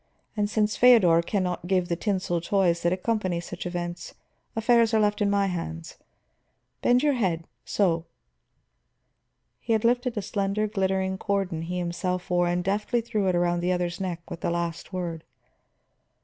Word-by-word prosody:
And 205 -1 0
since 210 0 +1
Feodor 205 -10 +6
can 190 +3 -1
not 180 -1 -3
give 185 -1 +1
the 170 - 0
tinsel 185 -3 -1
toys 175 -2 +1
that 170 - +2
accompany 185 -2 -1
such 175 +1 -6
events, 175 -1 -5 0.4
affairs 230 0 +3
are - - +4
left 210 0 +1
in 205 - +3
my 200 0 +2
hands. 80 - -5 0.8
Bend 245 +2 +3
your 295 -1 +3
head 185 -9 0 0.2
so." 170 -5 +1 1.5
He 230 - -1
had 220 0 +1
lifted 245 0 +1
a 205 - -1
slender, 200 +1 -1
glittering 190 -2 -1
cordon 195 -5 -1
he 175 +2 -4
himself 180 +1 -3
wore, 175 0 +3
and 175 0 0
deftly 210 +5 0
threw 215 -4 -1
it 185 - +2
around 175 0 +1
the 175 +1 0
other's 180 0 -2
neck 175 -3 -4
with 165 - -8
the - - 0
last 170 0 -3
word. 175 -4 -4
185 Hz, 165 wpm, -26 LUFS, 175-210 Hz, 1.5 s, Feodor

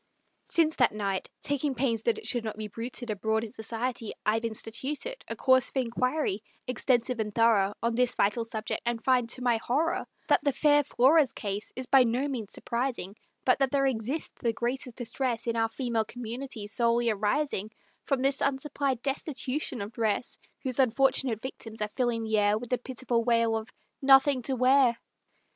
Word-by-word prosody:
Since 320 -2 +2
that - - +4
night, 195 -3 -2
taking 285 -1 -1
pains 235 -3 0
that 230 0 +1
it - - -9
should 240 -2 0
not 215 -1 -5
be 215 -1 -4
bruited 235 +2 -3
Abroad 220 +2 0
in 225 - -6
society, 230 0 -4
I've 225 +2 +1
instituted 265 - -4
A - - -4
course 260 -2 +3
of - - -7
inquiry, 255 -2 0 0.2
extensive 250 -1 +1
and 210 -1 -3
thorough, 215 -4 +3
On 235 0 +1
this 245 +1 +1
vital 210 +3 +2
subject, 220 -1 -3
and 235 -1 -2
find, 250 -3 +2
to 250 +1 -2
my 240 -2 +3
horror, 285 +9 0 0.2
That - - +5
the 285 - +1
fair 290 0 +4
Flora's 275 +1 +4
case 205 0 -4
is 255 - -4
by 265 0 +6
no 250 +4 0
means 235 -7 -4
surprising, 235 -5 -3 0.3
But 255 - +4
that 270 -1 +3
there 275 +1 +2
exists 265 +4 -2
the 230 -1 +1
greatest 245 +1 -3
distress 240 -1 -2
In 230 -1 -1
our 225 0 +1
female 230 -2 -1
community, 240 -1 -5
solely 235 +2 +1
arising 215 +1 -1 0.4
From 270 -2 0
this 275 0 +2
unsupplied 275 -2 -1
destitution 275 -2 -2
of 200 +2 -5
dress, 225 +1 -1 0.2
Whose 260 -1 +1
unfortunate 260 -2 +3
victims 225 -4 -6
are 210 0 -1
filling 240 -1 -1
the 220 -1 +1
air 205 0 +3
With 240 +2 -8
the 250 - +1
pitiful 245 -2 -2
wail 230 -1 +2
of 220 +1 -4 0.3
"Nothing 270 0 +5
to 265 +2 0
wear." 255 -1 +4
240 Hz, 180 wpm, -28 LUFS, 225-265 Hz, 0.4 s, by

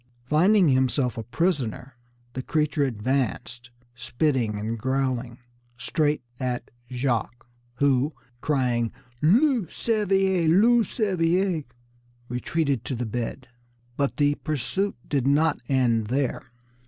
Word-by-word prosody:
Finding 175 - +4
himself 130 -1 +1
a 115 - -4
prisoner, 135 - -2 0.4
the 130 - -3
creature 150 0 0
advanced, 120 0 -2 0.2
spitting 125 -2 -1
and 110 +2 -3
growling, 130 -1 -1 0.4
straight 150 +4 0 0.2
at 125 -2 -3 0.2
Jacques, 120 -2 -2 0.3
who, 140 +1 +2 0.3
crying, 125 -6 0 0.3
"Loup 230 - +3
cervier! 195 -5 +1
loup 220 +6 +5
cervier!" 180 - 0 0.6
retreated 135 +1 -1
to 135 - -3
the 120 +1 -3
bed. 120 +3 -4 0.5
But 140 0 -1
the 145 -1 +3
pursuit 155 +8 -2
did 135 -3 0
not 150 +2 +3
end 120 -5 +2
there. 130 0 -2
135 Hz, 105 wpm, -25 LUFS, 125-165 Hz, 0.6 s, loup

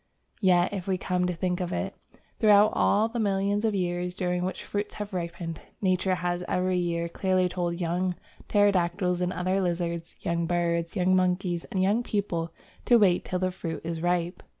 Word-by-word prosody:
Yet 180 -1 +4
if 190 -2 -4
we 190 -1 +1
come 180 0 0
to 180 - -1
think 180 +1 -1
of 180 -1 -2
it, - - -3 0.4
throughout 210 -2 +6
all 215 +2 +3
the 235 +1 -4
millions 200 0 +1
of 220 -2 +1
years 180 -1 -1
during 180 -2 -1
which 185 - -3
fruits 205 0 -4
have 210 -1 -6
ripened, 170 -2 -4 0.2
Nature 185 -1 +1
has 175 0 -2
every 185 0 +1
year 170 -1 -1
clearly 185 +1 +1
told 175 -1 -2
young 180 +1 0 0.3
pterodactyls 180 -3 +2
and 180 0 0
other 185 +2 0
lizards, 170 -2 -2
young 170 0 -1
birds, 170 0 0
young 185 -1 +3
monkeys, 180 -1 0
and 185 -1 -1
young 205 +5 +2
people 180 -7 -2 0.3
to 240 - +6
wait 190 -5 +4
till 185 - -2
the 185 0 0
fruit 165 -3 -5
is 165 -1 -4
ripe. 175 0 0
180 Hz, 180 wpm, -27 LUFS, 175-190 Hz, 0.4 s, throughout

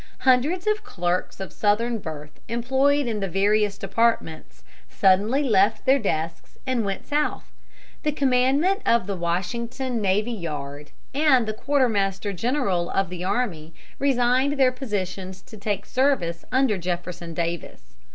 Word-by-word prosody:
Hundreds 285 - +3
of 425 0 +1
clerks 175 +1 -2
of 190 - -6
Southern 225 +3 +1
birth 150 -4 -8
employed 265 +5 +2
in 225 -3 -2
the 195 - -1
various 205 +2 +1
departments 160 - -1 0.3
suddenly 205 +9 +3
left 215 -4 +2
their 270 +1 +5
desks 165 -5 -3
and 255 -3 0
went 195 -1 -3
South. 295 +1 -1 0.5
The 300 - 0
commandant 280 - +2
of 235 -5 +3
the 200 0 -3
Washington 230 +8 -2
navy 205 +4 +1
yard 150 -7 -6 0.2
and 270 -4 +4
the 215 - -1
quartermaster 210 -6 0
general 195 -5 0
of 195 -2 0
the 180 -1 -5
army 175 -7 -2 0.2
resigned 260 0 +2
their 260 -1 +5
positions 195 -7 -4
to 220 - -13
take 200 -1 -3
service 250 -12 0
under 255 -7 +2
Jefferson 175 -1 -4
Davis. 165 - -4
210 Hz, 135 wpm, -24 LUFS, 180-255 Hz, 0.5 s, their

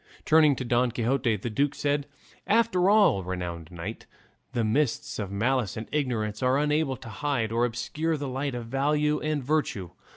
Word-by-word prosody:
Turning 155 -2 +5
to 130 - -4
Don 120 +1 +2
Quixote, 120 0 +1
the 105 +4 -4
duke 140 +5 +1
said, 145 0 0 0.4
"After 205 -3 +3
all, 200 - +4
renowned 85 -3 -5
knight, 85 -2 -7 0.4
the 120 -3 0
mists 120 +3 0
of 100 -3 -3
malice 115 +3 0
and 110 - -5
ignorance 115 -7 -1
are 130 +1 +3
unable 150 -2 +1
to 115 - -10
hide 115 -1 -1
or 115 +1 +2
obscure 150 +7 -2
the 145 -1 -4
light 135 +1 -2
of 120 -1 -5
valour 150 +4 +1
and 155 -2 -1
virtue. 125 - -1
130 Hz, 170 wpm, -27 LUFS, 110-150 Hz, 0.4 s, Turning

